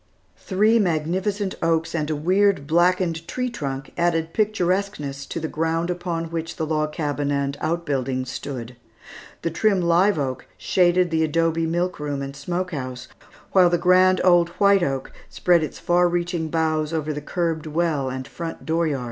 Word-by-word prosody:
Three 215 +4 +2
magnificent 190 +3 0
oaks 165 0 +1
and 155 -2 -1
a 155 - 0
weird, 185 +1 +2
blackened 170 +1 +1
tree 250 -1 -2
trunk 135 - -5
added 165 -1 +1
picturesqueness 185 -9 -1
to - - -4
the 160 - -3
ground 165 +2 -1
upon 170 -2 -3
which 165 0 -4
the 160 - -2
log 155 -1 -1
cabin 145 -2 -2
and 140 -1 -1
outbuildings 135 -6 -1
stood. 125 -3 -6 0.7
The 165 - -1
trim 200 +3 +2
live 175 +3 +3
oak 130 -3 -3
shaded 180 -1 +2
the 160 0 +2
adobe 165 +1 +1
milk 175 +2 -1
room 145 -2 -3
and 135 0 -7
smoke 175 +6 -3
house, 130 -4 -6 0.4
while 185 -2 +6
the 175 - +2
grand 185 +1 +4
old 175 -2 +5
white 200 -1 +5
oak 135 -4 -2 0.2
spread 175 -2 +3
its 155 - -4
far 175 0 +2
reaching 175 -1 -1
boughs 155 -1 0
over 155 -1 -1
the 150 - -5
curbed 165 0 -2
well 155 -4 0
and 130 +1 -5
front 165 -1 -7
dooryard. 160 -3 0
165 Hz, 165 wpm, -23 LUFS, 150-180 Hz, 0.7 s, while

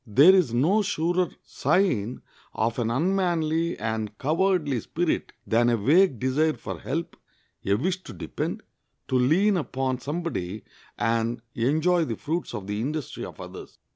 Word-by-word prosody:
There 140 - +7
is 180 -10 +3
no 160 - +3
surer 180 -2 0
sign 130 - 0 0.3
of 115 +3 0
an 115 -2 0
unmanly 170 +2 +1
and 110 -1 -3
cowardly 160 -3 +1
spirit 170 +7 -1
than 120 +1 +3
a 120 - +2
vague 150 - +4
desire 145 +6 +1
for - - -7
help, 165 +5 -3 0.5
a 100 - +2
wish 180 - -1
to - - -8
depend, - - -4 0.5
to 130 - 0
lean 185 +11 +3
upon 130 -5 -2
somebody 130 - -4 0.3
and 115 +2 0
enjoy 160 +8 +2
the 115 - -3
fruits 165 -4 -3
of 105 -3 -5
the 105 +2 -3
industry 150 +2 -4
of - - -11
others. - - -10
145 Hz, 145 wpm, -26 LUFS, 115-175 Hz, 0.5 s, There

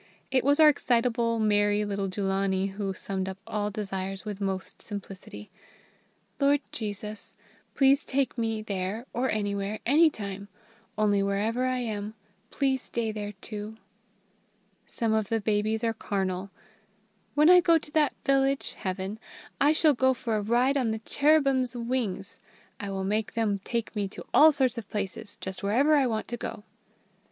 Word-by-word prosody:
It 260 -1 +2
was 285 +3 +3
our 310 - +9
excitable, 235 -4 +2
merry 205 -1 +2
little 200 -1 -2
Jullanie 195 0 0
who 195 0 -3
summed 190 -1 -3
up 190 - -6
all 210 -1 -2
desires 195 -2 -4
with 205 -1 -5
most 190 -3 -3
simplicity: 195 - -8 0.9
"Lord 285 0 +4
Jesus, 210 -1 -6 0.4
please 275 +1 +4
take 275 0 0
me 225 -2 -2
there 200 +3 -3
or 255 +2 0
anywhere 205 0 -1
anytime; 220 - +2 0.5
only 205 -2 +3
wherever 210 +5 0
I 255 0 0
am, 215 -3 -4 0.3
please 265 -2 0
stay 230 -3 -2
there 210 -1 -5
too!" 215 0 -6 1.1
Some 225 -2 -1
of 220 -2 0
the 225 - +1
babies 215 +1 0
are 225 -1 +1
carnal: 195 -3 -2 0.9
"When 300 +1 +5
I 360 +1 +8
go 335 -1 +5
to 295 -1 -7
that 300 -1 +2
village 275 0 +1
(Heaven), 190 +2 -4 0.4
I 285 +2 +5
shall 310 -1 +4
go 260 0 +2
for 230 -2 -2
a 210 - 0
ride 245 +6 +2
on 250 -4 +1
the 220 - -1
cherubim's 275 -4 +3
wings. 230 -5 -3 0.4
I 200 - -5
will 195 -1 -3
make 210 +2 -1
them 215 -3 +1
take 235 -2 -3
me 205 -1 -1
to - - -10
all 315 +1 +8
sorts 260 -4 +1
of 220 - -11
places, 205 +1 -4
just 190 0 -6
wherever 260 +10 +3
I 275 -3 +3
want 220 -2 -2
to 240 - -3
go." 210 - -6
220 Hz, 160 wpm, -28 LUFS, 200-255 Hz, 1.1 s, our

